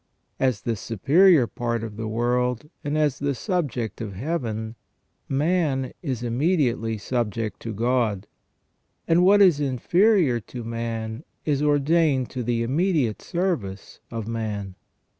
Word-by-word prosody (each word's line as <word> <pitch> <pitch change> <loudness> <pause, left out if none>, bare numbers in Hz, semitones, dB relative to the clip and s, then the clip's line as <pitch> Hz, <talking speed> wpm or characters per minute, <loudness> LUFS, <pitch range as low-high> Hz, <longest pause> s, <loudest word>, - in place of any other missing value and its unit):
As 130 -6 +1
the 115 - -1
superior 140 - +4
part 115 +1 -3
of 110 -2 -6
this 110 +1 -4
world, 125 +4 0
and 145 +1 -1
as 150 -3 +1
the 140 -1 -1
subject 135 - -2
of 105 -3 -5
Heaven, 110 - -3 0.6
man 145 -2 0
is 130 - -3
immediately 120 -3 +1
subject 110 -2 -2
to 115 - -5
God, 110 -3 0 0.8
and 170 +2 +4
what 200 +2 +7
is 175 -7 +5
inferior 150 - +3
to 120 +3 -8
man 115 +1 -4 0.2
is 145 -2 +1
ordained 145 -2 +2
to 125 - -4
the 115 0 0
immediate 140 - +1
service 165 - -3
of 115 -2 -5
man. 105 -4 -3
125 Hz, 130 wpm, -24 LUFS, 115-150 Hz, 0.8 s, what